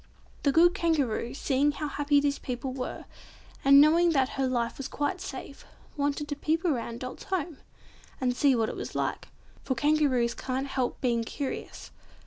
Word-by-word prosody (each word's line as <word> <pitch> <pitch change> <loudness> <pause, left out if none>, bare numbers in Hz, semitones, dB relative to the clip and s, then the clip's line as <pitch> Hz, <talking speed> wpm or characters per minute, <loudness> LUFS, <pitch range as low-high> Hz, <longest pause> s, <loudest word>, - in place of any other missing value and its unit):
The 280 - +3
good 345 +4 +5
Kangaroo, 280 - 0
seeing 285 +1 +1
how 300 +1 -3
happy 290 0 +2
these 285 0 0
people 255 +1 -4
were, 255 -1 -5 0.6
and 275 +1 +8
knowing 330 +3 +5
that 265 -2 +2
her 270 -1 -1
life 240 -1 -1
was 275 - -4
quite 340 +6 -2
safe, 380 - -8 0.3
wanted 290 0 -1
to 290 - -2
peep 320 +4 -1
about 235 -7 -1
Dot's 255 +1 -7
home 345 -5 -3 0.6
and 250 -2 0
see 275 0 +4
what 225 -2 +1
it - - -5
was - - -6
like—for 260 - -4
Kangaroos 265 -3 +2
can't 260 +1 -3
help 265 -2 -2
being 235 -3 +1
curious. 270 +4 -6
280 Hz, 165 wpm, -28 LUFS, 255-300 Hz, 0.6 s, and